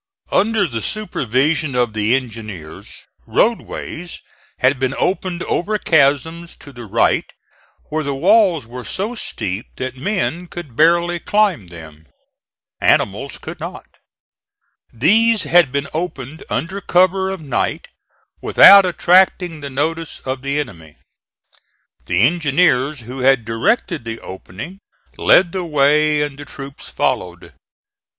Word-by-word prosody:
Under 210 0 +2
the 115 -8 -4
supervision 145 - -1
of 120 -3 +1
the 110 +3 +1
engineers, 110 -11 -7 0.2
roadways 180 -6 -2 0.4
had 130 +1 +2
been 130 0 -1
opened 185 -2 -1
over 210 +5 -1
chasms 160 +1 +1
to 140 - -14
the 120 -2 -10
right 100 - +1 0.6
where 155 0 -1
the 140 -1 -3
walls 180 - +3
were 125 +2 -9
so 205 - -3
steep 105 - -5
that 130 0 -5
men 180 +2 -2
could 170 -9 -9
barely 170 +3 +3
climb 200 - +1
them. 80 -2 -13 0.7
Animals - - +1
could - - -9
not. - - -7 1.1
These 210 - +3
had 170 -6 +4
been 140 0 -2
opened 155 -3 -5
under 190 +4 -3
cover 185 +1 +2
of 190 -1 -5
night, 140 -5 -2 0.5
without 200 -1 +8
attracting 180 -2 +2
the 140 - -6
notice 160 +4 -3
of 130 0 -4
the 140 +2 -2
enemy. 80 - -7 1.1
The 90 +4 +2
engineers, 145 -2 +2
who 125 +4 -8
had 130 -3 +3
directed 160 - -1
the 115 0 -5
opening, 100 - -9 0.4
led 175 -2 +4
the 185 0 -3
way 150 -1 +2
and 145 -1 -6
the 145 - -8
troops 135 0 -10
followed. 90 -1 -3
150 Hz, 125 wpm, -18 LUFS, 125-175 Hz, 1.1 s, without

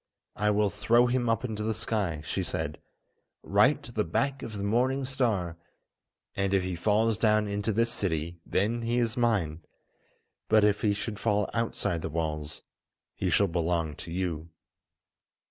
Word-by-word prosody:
"I 105 +1 +1
will 105 -1 +2
throw 115 +4 +3
him 120 -1 +1
up 115 +2 +1
into 110 -3 -4
the 110 0 -1
sky," 100 -8 -2
she - - -2
said, - - -3 0.6
"right - - +3
to - - -10
the - - 0
back 135 +11 -1
of 110 -2 -6
the 100 - -3
morning 130 +6 +1
star, 110 -11 -1 0.8
and 100 0 +1
if 95 - +2
he 90 -1 -3
falls 110 +4 +2
down 110 -1 +3
into 100 +2 -1
this 115 +3 +1
city, 85 -4 -2
then 110 +7 0
he 115 +1 0
is 115 -1 +1
mine. 100 - +1 0.9
But 110 -1 +5
if 105 0 +3
he 105 -2 +2
should 105 0 -4
fall 105 -2 +1
outside 115 -7 -1
the 80 - -3
walls, 75 -1 -3 0.5
he - - -2
shall 100 - +4
belong 85 -3 -1
to 85 - -8
you." 85 -3 -3
105 Hz, 165 wpm, -28 LUFS, 85-115 Hz, 0.9 s, But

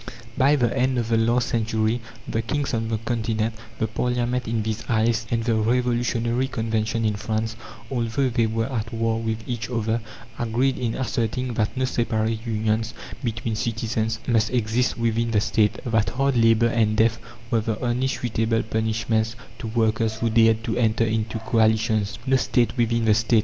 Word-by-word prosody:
By 140 +2 +4
the 120 -5 +1
end 130 0 +1
of 115 -2 -1
the 115 - +3
last 120 +2 +2
century 110 0 0 0.3
the 115 - -1
kings 140 +4 -2
on 115 -1 0
the 110 0 -1
Continent, 110 -1 -1 0.2
the - - 0
Parliament 125 +2 -1
in 115 -1 0
these 110 0 -3
isles, 115 0 +1
and 115 -1 0
the 115 0 +1
revolutionary 120 +2 +1
Convention 110 -1 -1
in 105 - +2
France, 110 +2 -2 0.4
although 120 +2 0
they 115 -1 +1
were 115 +1 -1
at 115 -3 -3
war 115 -1 0
with 115 0 -3
each 120 -2 -3
other, 115 -1 -1 0.4
agreed 120 +3 +1
in 115 -2 -1
asserting 125 0 -1
that 110 +2 -1
no 130 - +1
separate 115 -2 -1
unions 110 0 0 0.3
between 115 -1 -2
citizens 110 0 -1
must 115 -2 +2
exist 120 +1 0
within 115 0 0
the 110 -2 +2
State; 105 0 +1
that 115 -3 +1
hard 135 +1 0
labour 115 0 +4
and 110 -2 +1
death 110 0 +3 0.3
were 115 -2 +3
the 110 -1 -2
only 125 +2 0
suitable 115 -3 0
punishments 110 0 0 0.2
to - - -5
workers 110 0 +1
who 115 0 -1
dared 115 0 +4
to - - -2
enter 115 -1 +2
into 110 0 -1
"coalitions." 110 -2 +1
"No 135 0 +4
state 120 -2 +1
within 115 -1 +1
the 110 - +5
State!" 110 +1 +3
115 Hz, 175 wpm, -24 LUFS, 110-120 Hz, 0.4 s, the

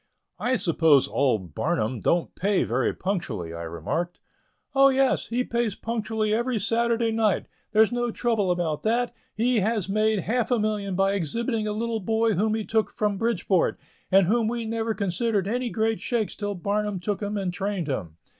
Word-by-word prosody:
"I 255 +1 +1
suppose 160 - +4
old 110 - 0
Barnum 130 - -1
don't 170 +9 +1
pay 200 +1 +1
very 125 +2 0
punctually," 125 - -3
I 85 - -6
remarked. 85 - -3 0.5
"Oh, 275 0 +6
yes, 270 0 +2
he 245 +2 0
pays 235 -4 -1
punctually 220 -2 -2
every 240 +2 0
Saturday 230 +2 +1
night 220 -3 +1 0.3
there's 220 +1 +4
no 240 0 0
trouble 225 -4 0
about 175 -4 0
that; 235 +2 0 0.2
he 235 +2 +2
has 210 -1 0
made 215 0 +2
half 240 +4 0
a 245 - +3
million 210 -3 -1
by 195 +1 +2
exhibiting 220 - -1
a - - -1
little 225 +1 -2
boy 225 +2 +1
whom 215 +4 +1
he 220 -1 -3
took 220 -1 +1
from 205 -2 -1
Bridgeport, 195 -5 +1 0.3
and 195 0 +6
whom 225 +4 +2
we 235 0 -2
never 225 0 -1
considered 200 +1 0
any 245 +3 -1
great 225 0 0
shakes 230 -4 -1
till 205 -1 -3
Barnum 205 +1 -1
took 205 +3 -3
him 205 0 -2
and 190 -3 -2
trained 195 -2 -2
him." 90 - -4
210 Hz, 175 wpm, -25 LUFS, 180-230 Hz, 0.5 s, Oh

